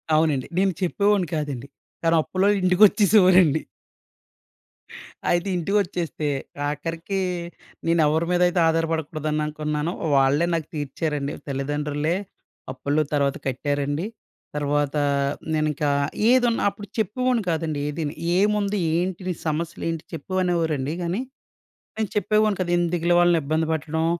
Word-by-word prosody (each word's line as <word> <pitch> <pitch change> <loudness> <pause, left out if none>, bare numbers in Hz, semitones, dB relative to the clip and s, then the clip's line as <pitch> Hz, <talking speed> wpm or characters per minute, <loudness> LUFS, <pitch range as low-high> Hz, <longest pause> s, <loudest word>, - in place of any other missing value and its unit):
అవునండి. 155 -4 +2
నేను 195 0 +3
చెప్పేవాడిని 200 0 +2
కాదండి. 140 -4 -4 0.4
కాని 165 0 +3
అప్పులోళ్ళు 200 +5 +1
ఇంటికొచ్చేసేవారండి. 185 -4 +5 1.7
అయితే 175 +2 +1
ఇంటికొచ్చేస్తే, 175 -4 -1 0.4
ఆఖరికి 165 +6 -3 0.7
నేనేవరి 160 -1 +3
మీదయితే 180 0 +3
ఆధారపడకూడదు 160 -1 -1
అని 150 - 0
అనుకున్నానో 150 +1 -2 0.2
వాళ్ళే 140 +4 +3
నాకు 160 -2 -1
తీర్చారండి. 145 0 -2
తల్లిదండ్రులే 145 +3 -1 0.6
అప్పుల్లు 140 +3 0
తర్వాత 140 -1 +1
కట్టారండి. 145 +4 -1 0.5
తర్వాతా, 145 0 0 0.5
నేనింకా 155 -1 0 0.4
ఏదున్నా 245 -2 +3
అప్పుడు 205 0 -10
చెప్పేవాడిని 235 +2 0
కాదండి 160 -3 -1
ఏదిని. 150 0 -3 0.3
"ఏముంది? 205 0 +1 0.2
ఏంటి? 180 +1 -1
నీ 180 - 0
సమస్యలేంటి?" 165 +1 -2
చెప్పు 165 +3 -7
అనేవారండి. 160 -5 0
గానీ 175 +7 -1 0.7
నేను 220 -3 -2
చెప్పేవాడిని 215 -1 +2
కాదు. 175 -1 -1
ఎందుకు‌లే 175 0 +1
వాళ్ళనిబ్బంది 160 -2 +2
పెట్టడం. 160 +1 -1
165 Hz, 105 wpm, -24 LUFS, 150-185 Hz, 1.7 s, ఇంటికొచ్చేసేవారండి